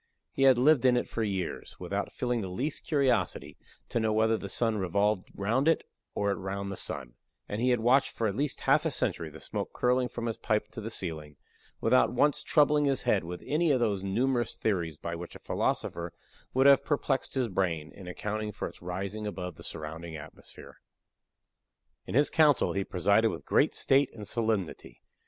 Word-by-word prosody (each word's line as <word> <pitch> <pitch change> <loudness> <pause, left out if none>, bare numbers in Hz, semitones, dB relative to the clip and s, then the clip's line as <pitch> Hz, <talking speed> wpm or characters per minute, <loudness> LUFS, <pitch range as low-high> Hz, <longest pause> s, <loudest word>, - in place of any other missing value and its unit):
He - - -4
had 130 - +5
lived 135 +1 +4
in 125 -1 +5
it - - -1
for 115 - -4
years, 95 -5 -3
without - - -3
feeling 125 -2 -1
the 95 - -4
least 135 - -3
curiosity 140 -4 +1 0.3
to - - 0
know 110 -1 +1
whether 110 +1 +3
the 100 -2 -5
sun 115 0 +1
revolved 100 +2 0
round 115 +9 +1
it, 165 - +3 0.3
or 100 0 +1
it - - -2
round 100 +1 -4
the - - -4
sun; 65 -8 -4 0.3
and 105 +2 -3
he 125 - +3
had 120 -2 +2
watched 125 +4 +4
for 115 - -2
at 100 - +1
least 140 +1 -2
half - - +3
a - - +1
century - - -1
the - - -12
smoke - - -4
curling 125 0 +2
from 120 -1 -5
his 115 -2 -2
pipe 105 -1 0
to 110 0 -7
the 110 - -5
ceiling, 80 -8 -5 0.5
without 125 +2 +4
once 145 +4 +2
troubling 150 -1 +3
his 135 -2 +1
head 100 - +2
with 90 +1 -7
any 160 +3 +1
of 135 -3 +3
those 105 -5 0
numerous 120 +5 0
theories 85 -8 -1
by 85 - -5
which 85 +1 -7
a - - -9
philosopher 85 0 -2 0.4
would 130 +1 +2
have 140 -1 +7
perplexed 140 -2 -1
his 130 -2 +1
brain, 90 -6 -1
in 95 -2 -11
accounting 105 +4 -3
for - - -4
its - - -13
rising 100 +4 -4
above 90 -4 -5
the - - -13
surrounding 80 +1 -7
atmosphere. 75 - -12 1.3
In - - -4
his 145 +2 +4
council 150 -4 +4
he 100 - 0
presided 100 +5 +2
with 85 - -6
great - - +2
state 135 0 +3
and 105 -3 -8
solemnity. 110 -6 -2
110 Hz, 195 wpm, -29 LUFS, 95-130 Hz, 1.3 s, have